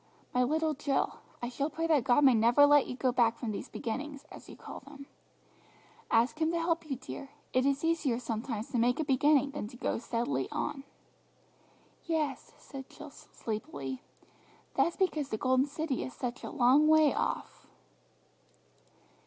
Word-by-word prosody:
"My 250 Hz, -, +3 dB
little 310 Hz, +4 st, +1 dB
Jill, 280 Hz, -1 st, -1 dB, 0.2 s
I 240 Hz, -, -1 dB
shall 280 Hz, +4 st, -2 dB
pray 325 Hz, +2 st, -3 dB
that 305 Hz, -7 st, +3 dB
God 255 Hz, +4 st, +4 dB
may 265 Hz, -2 st, +7 dB
never 235 Hz, +5 st, +6 dB
let 290 Hz, -1 st, +5 dB
you 250 Hz, -, -5 dB
go 255 Hz, 0 st, +1 dB
back 235 Hz, -2 st, +2 dB
from 230 Hz, -4 st, -3 dB
these 205 Hz, -, -6 dB
beginnings, 275 Hz, +5 st, -5 dB
as -, -, -12 dB
you -, -, -10 dB
call -, -, -9 dB
them. 280 Hz, 0 st, -12 dB, 1.0 s
Ask 235 Hz, +7 st, +2 dB
Him 315 Hz, -, +3 dB
to -, -, +1 dB
help 330 Hz, -1 st, -1 dB
you, 270 Hz, -, -1 dB
dear. 265 Hz, +2 st, -8 dB, 0.2 s
It 255 Hz, +1 st, +3 dB
is 280 Hz, +2 st, 0 dB
easier 320 Hz, -7 st, +1 dB
sometimes 230 Hz, -1 st, -4 dB
to 245 Hz, -, 0 dB
make 245 Hz, +4 st, +2 dB
a -, -, +2 dB
beginning 285 Hz, 0 st, +3 dB
than 275 Hz, -7 st, -5 dB
go 245 Hz, 0 st, -3 dB
steadily 230 Hz, -, -2 dB
on." 275 Hz, -1 st, -3 dB, 1.2 s
"Yes," 310 Hz, -5 st, -2 dB
said 270 Hz, -2 st, -10 dB
Jill 300 Hz, -1 st, -11 dB
sleepily; 140 Hz, -, -6 dB, 0.7 s
"but -, -, +4 dB
that's 340 Hz, -, -3 dB
because 310 Hz, -7 st, 0 dB
the 220 Hz, -, -2 dB
Golden 260 Hz, +3 st, +2 dB
City 290 Hz, -2 st, -2 dB
is 255 Hz, -, -7 dB
such 245 Hz, -1 st, -4 dB
a -, -, -5 dB
long 275 Hz, +4 st, +4 dB
way 310 Hz, -2 st, +5 dB
off!" -, -, -3 dB
275 Hz, 170 wpm, -31 LUFS, 240-300 Hz, 1.2 s, may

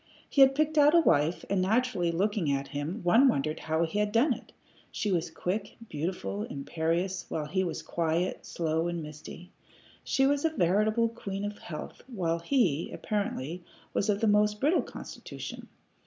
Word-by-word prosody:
He 280 Hz, -, +2 dB
had 270 Hz, 0 st, +7 dB
picked 310 Hz, +1 st, +2 dB
out 295 Hz, +3 st, +6 dB
a -, -, +8 dB
wife, 160 Hz, -, +2 dB
and 195 Hz, -1 st, +1 dB
naturally, 205 Hz, -3 st, +1 dB
looking 190 Hz, -2 st, 0 dB
at 140 Hz, 0 st, -1 dB
him, 155 Hz, +9 st, -4 dB
one 225 Hz, +10 st, +6 dB
wondered 155 Hz, -, 0 dB
how 160 Hz, +1 st, 0 dB
he 165 Hz, +6 st, -2 dB
had 210 Hz, 0 st, +1 dB
done 230 Hz, +7 st, +4 dB
it. -, -, -11 dB, 0.4 s
She 210 Hz, -, -1 dB
was 170 Hz, -3 st, 0 dB
quick, 190 Hz, +5 st, -3 dB
beautiful, 145 Hz, -, -3 dB
imperious, 165 Hz, -, -2 dB
while 155 Hz, -, -2 dB
he 185 Hz, +5 st, 0 dB
was 170 Hz, -4 st, -4 dB
quiet, 170 Hz, +2 st, -1 dB
slow, 160 Hz, 0 st, -1 dB
and 170 Hz, -1 st, -3 dB
misty. 155 Hz, +4 st, -10 dB, 0.5 s
She 270 Hz, -, +2 dB
was 285 Hz, +1 st, +2 dB
a 325 Hz, -, +3 dB
veritable 215 Hz, -, +2 dB
queen 200 Hz, -3 st, -5 dB
of 205 Hz, 0 st, -5 dB
health, 155 Hz, -3 st, -8 dB
while 175 Hz, -9 st, -1 dB
he, 170 Hz, -, +1 dB
apparently, 180 Hz, -5 st, -3 dB, 0.3 s
was 205 Hz, -, 0 dB
of 205 Hz, +1 st, +1 dB
a -, -, +4 dB
most 210 Hz, 0 st, +3 dB
brittle 305 Hz, +8 st, +3 dB
constitution. -, -, -8 dB
185 Hz, 170 wpm, -29 LUFS, 160-215 Hz, 0.5 s, a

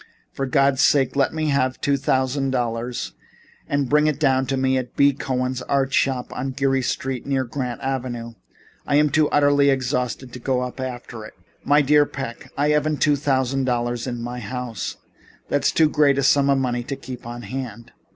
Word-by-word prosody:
For 135 Hz, -, -3 dB
God's 135 Hz, 0 st, +3 dB
sake 135 Hz, -3 st, +3 dB
let 140 Hz, -1 st, +2 dB
me 155 Hz, -1 st, -1 dB
have 130 Hz, -2 st, +1 dB
two 140 Hz, -2 st, +1 dB
thousand 135 Hz, 0 st, 0 dB
dollars 120 Hz, -1 st, -2 dB, 0.5 s
and 140 Hz, -1 st, 0 dB
bring 150 Hz, +3 st, +3 dB
it 150 Hz, -2 st, 0 dB
down 135 Hz, -3 st, +2 dB
to 135 Hz, -, -1 dB
me 130 Hz, 0 st, +1 dB
at 130 Hz, -2 st, -3 dB
B. 140 Hz, 0 st, +4 dB
Cohen's 130 Hz, -1 st, -2 dB
Art 135 Hz, +1 st, 0 dB
Shop 130 Hz, -2 st, 0 dB
on 135 Hz, +1 st, -4 dB
Geary 135 Hz, 0 st, +1 dB
Street 130 Hz, 0 st, -3 dB
near 135 Hz, -1 st, +1 dB
Grant 125 Hz, -1 st, -4 dB
Avenue. 125 Hz, -3 st, -3 dB, 0.5 s
I'm 150 Hz, 0 st, +3 dB
too 155 Hz, -2 st, +3 dB
utterly 145 Hz, -1 st, +4 dB
exhausted 125 Hz, -1 st, -1 dB
to 125 Hz, -, -7 dB
go 125 Hz, +1 st, 0 dB
up 125 Hz, +1 st, -5 dB
after 125 Hz, -3 st, -6 dB
it." 110 Hz, -, -11 dB, 0.3 s
"My 145 Hz, +1 st, +4 dB
dear 145 Hz, +1 st, +4 dB
Mr. -, -, -24 dB
Peck, 125 Hz, -4 st, -6 dB
I 145 Hz, +1 st, +2 dB
haven't 150 Hz, 0 st, +1 dB
two 145 Hz, 0 st, +3 dB
thousand 135 Hz, -2 st, 0 dB
dollars 120 Hz, -1 st, -1 dB
in 120 Hz, -2 st, -4 dB
my 120 Hz, +1 st, -5 dB
house. 120 Hz, 0 st, -5 dB, 0.5 s
That 145 Hz, -1 st, 0 dB
is -, -, +4 dB
too 160 Hz, -, +4 dB
great 150 Hz, -2 st, +3 dB
a 140 Hz, -, +1 dB
sum 140 Hz, +1 st, +4 dB
of 140 Hz, -, +4 dB
money 125 Hz, -2 st, -1 dB
to 135 Hz, +3 st, -5 dB
keep 125 Hz, -3 st, -9 dB
on 120 Hz, 0 st, -7 dB
hand." 120 Hz, 0 st, -6 dB
130 Hz, 195 wpm, -22 LUFS, 125-140 Hz, 0.5 s, B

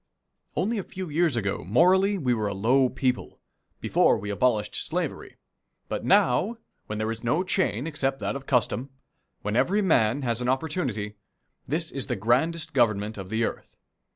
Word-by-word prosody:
Only 215 Hz, +4 st, 0 dB
a -, -, -3 dB
few 185 Hz, -1 st, -7 dB
years 160 Hz, -2 st, +2 dB
ago 100 Hz, -8 st, -2 dB
morally 185 Hz, -, +4 dB
we 130 Hz, -8 st, +1 dB
were 110 Hz, -3 st, -1 dB
a 100 Hz, -, -3 dB
low 125 Hz, +6 st, +3 dB
people 130 Hz, -1 st, -2 dB, 0.4 s
before -, -, +3 dB
we 105 Hz, +1 st, -5 dB
abolished 105 Hz, -1 st, +1 dB
slavery -, -, -3 dB, 0.5 s
but -, -, -3 dB
now, 200 Hz, -, +3 dB, 0.3 s
when 105 Hz, -, -4 dB
there 110 Hz, +1 st, -1 dB
is 115 Hz, +1 st, -7 dB
no 150 Hz, +10 st, +1 dB
chain 180 Hz, -, 0 dB
except 135 Hz, -4 st, -1 dB
that -, -, -2 dB
of 135 Hz, -1 st, -7 dB
custom, 125 Hz, +1 st, +1 dB, 0.5 s
when 105 Hz, +1 st, -2 dB
every 200 Hz, -, +2 dB
man 135 Hz, -, +2 dB
has 120 Hz, -1 st, -1 dB
an 125 Hz, -, 0 dB
opportunity, 130 Hz, -, -2 dB, 0.5 s
this 160 Hz, +4 st, -1 dB
is 135 Hz, -6 st, -4 dB
the -, -, -1 dB
grandest 135 Hz, -, 0 dB
Government 110 Hz, -4 st, +2 dB
of 95 Hz, -1 st, -7 dB
the 110 Hz, +2 st, 0 dB
earth. -, -, -5 dB
125 Hz, 170 wpm, -26 LUFS, 110-160 Hz, 0.5 s, morally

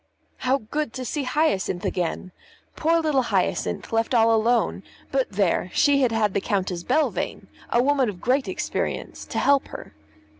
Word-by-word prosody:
How 260 Hz, +2 st, +1 dB
good 280 Hz, +2 st, -4 dB
to 255 Hz, -1 st, -5 dB
see 285 Hz, +3 st, -2 dB
Hyacinth 250 Hz, -, 0 dB
again! 180 Hz, +1 st, -2 dB, 0.4 s
Poor 330 Hz, +2 st, +2 dB
little 300 Hz, -4 st, +2 dB
Hyacinth 240 Hz, -, -1 dB
left 225 Hz, +2 st, +1 dB
all 225 Hz, 0 st, +5 dB
alone; 230 Hz, +2 st, +1 dB, 0.3 s
but -, -, 0 dB
there! -, -, +1 dB
she 285 Hz, -1 st, +4 dB
had 250 Hz, -3 st, +3 dB
had 215 Hz, -3 st, +1 dB
the 200 Hz, -, 0 dB
Countess 190 Hz, -5 st, -1 dB
Belvane, 280 Hz, -, -1 dB, 0.2 s
a 240 Hz, -, +3 dB
woman 275 Hz, -3 st, +2 dB
of 190 Hz, -4 st, -7 dB
great 260 Hz, +5 st, +1 dB
experience, -, -, -3 dB
to -, -, -5 dB
help 280 Hz, -1 st, +3 dB
her. -, -, -10 dB
250 Hz, 160 wpm, -24 LUFS, 215-280 Hz, 0.4 s, all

